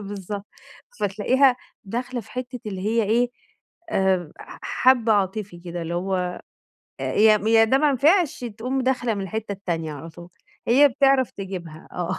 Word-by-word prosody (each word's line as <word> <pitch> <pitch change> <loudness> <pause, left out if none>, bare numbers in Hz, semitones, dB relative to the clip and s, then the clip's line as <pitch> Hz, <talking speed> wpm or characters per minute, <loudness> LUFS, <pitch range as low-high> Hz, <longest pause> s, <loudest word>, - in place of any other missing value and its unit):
بالضبط، 200 0 -6 0.5
فتلاقيها 250 +6 +3 0.3
داخلة 245 +4 -4
في 220 - -17
حتّة 250 0 -6
اللي 195 -3 -4
هي 230 +1 +2
إيه، 235 +4 +2 0.6
آآ 190 - +1
ح - - -11
حبّة 245 -4 +3
عاطفي 195 -2 -1
كده، 175 0 -6
اللي 165 +1 -4
هو 180 0 -2 0.6
أ - - -4
ي 215 - +5 0.4
ي - - +7
ده 260 +5 +3
ما 300 -1 +3
نفعش 305 +1 +2
تقوم 240 +4 -3
داخلة 250 -3 0
من 200 - -4
الحتّة 210 +2 -4
التانية 170 -5 -3
على 155 +3 -8
طول، 175 +1 -12 0.4
هي 280 +5 +6
بتعرف 270 -1 +3
تجيبها 180 -5 -8
آه 175 -1 -3
210 Hz, 160 wpm, -23 LUFS, 185-250 Hz, 0.6 s, ي